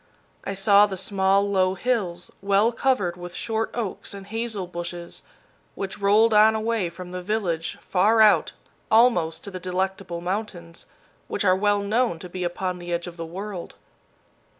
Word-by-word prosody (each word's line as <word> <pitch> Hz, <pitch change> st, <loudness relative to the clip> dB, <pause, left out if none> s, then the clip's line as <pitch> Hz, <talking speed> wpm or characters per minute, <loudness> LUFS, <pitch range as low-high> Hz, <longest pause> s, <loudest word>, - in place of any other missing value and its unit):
I 195 Hz, -, -4 dB
saw 200 Hz, +1 st, +5 dB
the 190 Hz, -2 st, -5 dB
small, 195 Hz, +1 st, +2 dB
low 190 Hz, -2 st, +2 dB
hills, 185 Hz, -6 st, -2 dB
well 200 Hz, +3 st, +3 dB
covered 220 Hz, -9 st, 0 dB
with 175 Hz, 0 st, -9 dB
short 225 Hz, -1 st, -2 dB
oaks 215 Hz, -3 st, -4 dB
and 195 Hz, -1 st, -9 dB
hazel 220 Hz, -2 st, -3 dB
bushes, 175 Hz, 0 st, -6 dB, 0.5 s
which 195 Hz, 0 st, -5 dB
rolled 210 Hz, +3 st, +4 dB
on 215 Hz, +1 st, +6 dB
away 220 Hz, -4 st, -1 dB
from 180 Hz, +1 st, -10 dB
the 180 Hz, 0 st, -5 dB
village, 180 Hz, -5 st, -2 dB
far 210 Hz, +5 st, +2 dB
out, 215 Hz, -1 st, +5 dB, 0.4 s
almost 175 Hz, -9 st, +3 dB
to 200 Hz, -, -8 dB
the 185 Hz, -, -6 dB
Delectable 185 Hz, -1 st, -3 dB
Mountains, 175 Hz, -2 st, -5 dB, 0.4 s
which -, -, -2 dB
are 185 Hz, -1 st, +5 dB
well 205 Hz, +1 st, +2 dB
known 220 Hz, -2 st, +1 dB
to 180 Hz, +2 st, -10 dB
be 185 Hz, +1 st, -5 dB
upon 180 Hz, +1 st, -3 dB
the 175 Hz, 0 st, -7 dB
edge 170 Hz, 0 st, -1 dB
of 175 Hz, -1 st, -8 dB
the 165 Hz, -1 st, -6 dB
world. 190 Hz, +1 st, -7 dB
195 Hz, 165 wpm, -24 LUFS, 175-210 Hz, 0.5 s, on